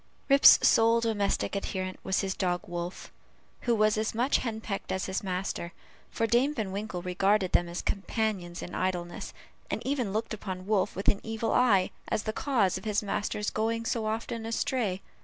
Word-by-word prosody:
Rip's 275 Hz, +1 st, +9 dB
sole 230 Hz, +1 st, +5 dB
domestic 210 Hz, -4 st, 0 dB
adherent 185 Hz, -1 st, -3 dB
was 190 Hz, 0 st, +1 dB
his 195 Hz, -1 st, -1 dB
dog 180 Hz, -2 st, -1 dB
Wolf, 175 Hz, +1 st, -6 dB, 0.6 s
who 235 Hz, -, +5 dB
was 215 Hz, 0 st, +3 dB
as 220 Hz, 0 st, -2 dB
much 245 Hz, +5 st, +3 dB
henpecked 220 Hz, -4 st, -4 dB
as 190 Hz, -, -1 dB
his 190 Hz, 0 st, -2 dB
master; 180 Hz, -2 st, -3 dB, 0.4 s
for 225 Hz, -, 0 dB
Dame 245 Hz, +6 st, +2 dB
Van 210 Hz, -5 st, -2 dB
Winkle 195 Hz, -3 st, -4 dB
regarded 190 Hz, +1 st, +2 dB
them 175 Hz, -, +2 dB
as 175 Hz, -, -4 dB
companions 195 Hz, -4 st, -2 dB
in 175 Hz, -, -8 dB
idleness, 175 Hz, -2 st, -3 dB, 0.4 s
and -, -, -1 dB
even 260 Hz, -7 st, -1 dB
looked 220 Hz, +2 st, -2 dB
upon 190 Hz, -3 st, -6 dB
Wolf 205 Hz, -2 st, +1 dB
with 195 Hz, -, -5 dB
an 200 Hz, -, +3 dB
evil 225 Hz, 0 st, -2 dB
eye, 205 Hz, -7 st, +4 dB, 0.2 s
as 215 Hz, -, -1 dB
the 215 Hz, -, -2 dB
cause 225 Hz, -10 st, +1 dB
of -, -, -16 dB
his 210 Hz, -1 st, 0 dB
master's 205 Hz, +1 st, -2 dB
going 230 Hz, +1 st, -1 dB
so 225 Hz, -2 st, -1 dB
often 225 Hz, +1 st, -3 dB
astray. 225 Hz, -4 st, -1 dB
210 Hz, 175 wpm, -29 LUFS, 185-225 Hz, 0.6 s, Rip's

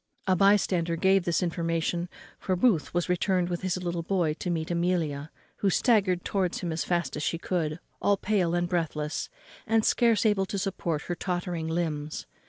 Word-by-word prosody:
A 185 Hz, -, +3 dB
by 195 Hz, +3 st, +6 dB
stander 175 Hz, -4 st, 0 dB
gave 190 Hz, +1 st, +3 dB
this 170 Hz, +2 st, +1 dB
information; 170 Hz, 0 st, -1 dB, 0.3 s
for 185 Hz, -, 0 dB
Booth 180 Hz, -4 st, +2 dB
was 175 Hz, 0 st, 0 dB
returned 180 Hz, 0 st, +1 dB
with 175 Hz, -1 st, -3 dB
his 185 Hz, -1 st, -1 dB
little 175 Hz, -2 st, -2 dB
boy 170 Hz, -3 st, 0 dB
to 180 Hz, -, -3 dB
meet 165 Hz, -1 st, -2 dB
Amelia, 170 Hz, -4 st, 0 dB, 0.3 s
who 200 Hz, -, +1 dB
staggered 195 Hz, -4 st, +2 dB
towards 185 Hz, -3 st, -1 dB
him 175 Hz, -3 st, -2 dB
as 160 Hz, -, -1 dB
fast 175 Hz, -1 st, -1 dB
as 150 Hz, -, -4 dB
she 165 Hz, -, 0 dB
could, 165 Hz, -3 st, -2 dB, 0.2 s
all 200 Hz, 0 st, +3 dB
pale 190 Hz, -5 st, +1 dB
and 175 Hz, 0 st, +1 dB
breathless, 160 Hz, -4 st, -2 dB, 0.4 s
and 225 Hz, 0 st, +3 dB
scarce 230 Hz, -2 st, +3 dB
able 200 Hz, -3 st, +2 dB
to 200 Hz, 0 st, -3 dB
support 180 Hz, -5 st, -2 dB
her 175 Hz, -, -3 dB
tottering 175 Hz, -2 st, -3 dB
limbs. 155 Hz, -3 st, -2 dB
175 Hz, 185 wpm, -28 LUFS, 165-190 Hz, 0.4 s, by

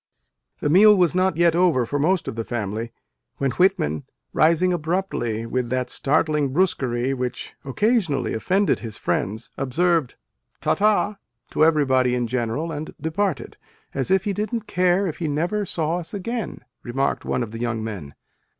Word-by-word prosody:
The -, -, 0 dB
meal 210 Hz, +6 st, +7 dB
was 180 Hz, -2 st, +3 dB
not 185 Hz, -2 st, +1 dB
yet 170 Hz, -1 st, +4 dB
over, 170 Hz, -9 st, +3 dB
for 145 Hz, +5 st, -2 dB
most 180 Hz, +5 st, +1 dB
of -, -, -4 dB
the 115 Hz, -, -2 dB
family, 110 Hz, 0 st, -4 dB, 0.5 s
when 135 Hz, -2 st, 0 dB
Whitman, 120 Hz, -, +1 dB, 0.3 s
rising 170 Hz, +3 st, +3 dB
abruptly 160 Hz, -, -2 dB
with 125 Hz, +1 st, -2 dB
that 125 Hz, 0 st, -1 dB
startling 150 Hz, 0 st, +1 dB
brusquerie 135 Hz, -7 st, +1 dB
which 125 Hz, -1 st, -4 dB
occasionally 170 Hz, -, +1 dB
offended 190 Hz, -, +1 dB
his 110 Hz, -3 st, -7 dB
friends, 105 Hz, +5 st, -2 dB
observed 160 Hz, +2 st, +1 dB, 0.4 s
"Ta -, -, +1 dB
ta!" 210 Hz, 0 st, +2 dB, 0.3 s
to -, -, +2 dB
everybody 130 Hz, -6 st, +3 dB
in 120 Hz, -1 st, 0 dB
general 125 Hz, +7 st, -2 dB
and 155 Hz, 0 st, -6 dB
departed 175 Hz, 0 st, -2 dB, 0.4 s
"as 135 Hz, +3 st, -1 dB
if 190 Hz, -1 st, +3 dB
he 205 Hz, -, -1 dB
didn 215 Hz, +3 st, -2 dB
t -, -, -26 dB
care 185 Hz, -1 st, +2 dB
if 165 Hz, -, -3 dB
he 165 Hz, -, -1 dB
never 175 Hz, +8 st, -1 dB
saw 165 Hz, -1 st, -1 dB
us 170 Hz, +3 st, -6 dB
again! 225 Hz, +2 st, -4 dB
" -, -, -58 dB
remarked 135 Hz, +3 st, -1 dB
one 125 Hz, -, -1 dB
of 110 Hz, -, -7 dB
the 115 Hz, -, -7 dB
young 120 Hz, -2 st, -2 dB
men. 95 Hz, -11 st, -6 dB
155 Hz, 170 wpm, -23 LUFS, 125-185 Hz, 0.5 s, meal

